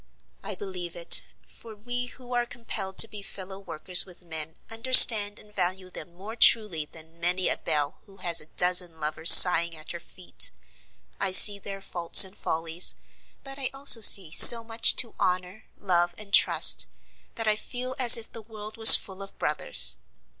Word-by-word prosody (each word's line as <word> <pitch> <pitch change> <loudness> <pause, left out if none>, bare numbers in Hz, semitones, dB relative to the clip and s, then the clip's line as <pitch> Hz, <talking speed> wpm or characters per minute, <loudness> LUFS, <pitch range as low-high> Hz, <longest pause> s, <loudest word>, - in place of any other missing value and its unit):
I - - -10
believe 180 -4 -11
it; 170 -1 +1 0.2
for 225 -2 -19
we 245 +3 -7
who 250 0 -16
are 240 0 -6
compelled 195 -6 -12
to - - +4
be 210 -2 -13
fellow 190 0 -13
workers 180 -1 -2
with 180 -1 -18
men 160 -1 -10
understand 225 -3 +3
and 210 0 -21
value 185 -1 -7
them 170 -1 -14
more 205 +5 -15
truly 210 -10 -1
than 160 +2 -17
many 180 +2 -5
a - - -6
belle 145 -1 -8
who 195 -1 -24
has 175 -3 -1
a 155 - -18
dozen 180 -1 -2
lovers 155 +2 0
sighing 170 -2 +5
at 155 - -16
her 170 - -13
feet. 180 +1 -5 0.7
I - - -6
see 200 +2 +5
their 195 0 -12
faults 175 0 +3
and 190 +1 -16
follies; 165 +2 -4 0.5
but 270 0 -13
I 265 - -7
also 270 -4 +3
see 190 -6 +4
so 230 +7 +8
much 225 0 -3
to 235 - -5
honor, 180 +3 -8
love, 175 -3 -5
and 205 -1 -16
trust, - - +2 0.5
that 225 - -9
I 215 - -2
feel 250 +3 -10
as 245 -2 +5
if 225 - -12
the 230 - -15
world 215 0 -15
was 225 0 +9
full 190 -1 -12
of 195 - -14
brothers. - - -4
190 Hz, 180 wpm, -20 LUFS, 170-225 Hz, 0.7 s, was